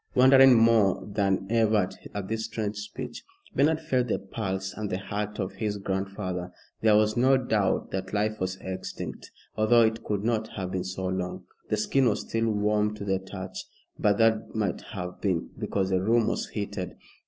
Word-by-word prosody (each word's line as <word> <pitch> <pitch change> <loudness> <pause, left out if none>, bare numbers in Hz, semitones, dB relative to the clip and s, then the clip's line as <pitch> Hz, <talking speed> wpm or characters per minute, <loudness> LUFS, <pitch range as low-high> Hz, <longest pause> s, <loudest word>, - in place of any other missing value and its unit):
Wondering 130 0 +8
more 115 -4 +4
than 100 -2 0
ever 110 -4 +3 0.3
at 100 -2 -3
this 110 +1 -2
strange 110 -2 -3
speech, 105 0 -7 0.3
Bernard 155 +3 +3
felt 130 -6 0
the 110 - +1
pulse 95 -1 -4
and 105 -1 -4
the 90 - -1
heart 105 +1 -4
of 95 - -2
his 105 -2 -3
grandfather. 95 -2 -3 0.3
There 110 -1 +5
was 105 0 +3
no 130 +2 +5
doubt 110 -6 0
that 95 0 -3
life 110 +1 0
was 95 0 -1
extinct, 95 0 -6 0.3
although 115 +2 +5
it 110 0 0
could 105 -1 -2
not 110 -1 0
have 95 -2 -4
been 95 -1 -2
so 95 0 -4
long. 95 -1 -3 0.3
The 110 - +1
skin 125 +4 +3
was 105 - -1
still 115 0 -1
warm 105 0 +1
to 100 -1 -6
the 95 -1 +1
touch, 95 -1 -7 0.4
but 100 -1 +3
that 115 -1 +2
might 105 -4 -1
have 90 -1 -6
been 90 -5 -1
because 95 -1 -1
the 95 -1 +2
room 115 +3 +3
was - - -2
heated. 100 -3 -4
105 Hz, 180 wpm, -27 LUFS, 95-110 Hz, 0.4 s, Wondering